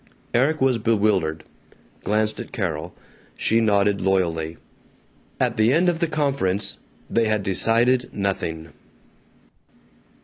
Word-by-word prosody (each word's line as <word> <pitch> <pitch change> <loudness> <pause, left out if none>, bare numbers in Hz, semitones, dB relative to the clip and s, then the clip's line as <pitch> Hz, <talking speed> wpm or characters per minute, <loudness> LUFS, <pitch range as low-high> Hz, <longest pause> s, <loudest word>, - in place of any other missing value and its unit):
Erik 140 +6 +2
was 130 -3 +3
bewildered; 100 -8 +1 0.6
glanced 110 +1 0
at - - -7
Carol. 80 -7 -4 0.4
She 115 +1 +1
nodded 100 -2 +2
loyally. 85 -4 0 0.8
At 125 -2 0
the 110 +2 +4
end 175 +5 +3
of 170 -2 -1
the 170 - +1
conference 135 - -1 0.3
they 115 -1 +1
had 110 -1 0
decided 120 +6 +2
nothing. 85 -5 -3
105 Hz, 110 wpm, -23 LUFS, 95-120 Hz, 0.8 s, the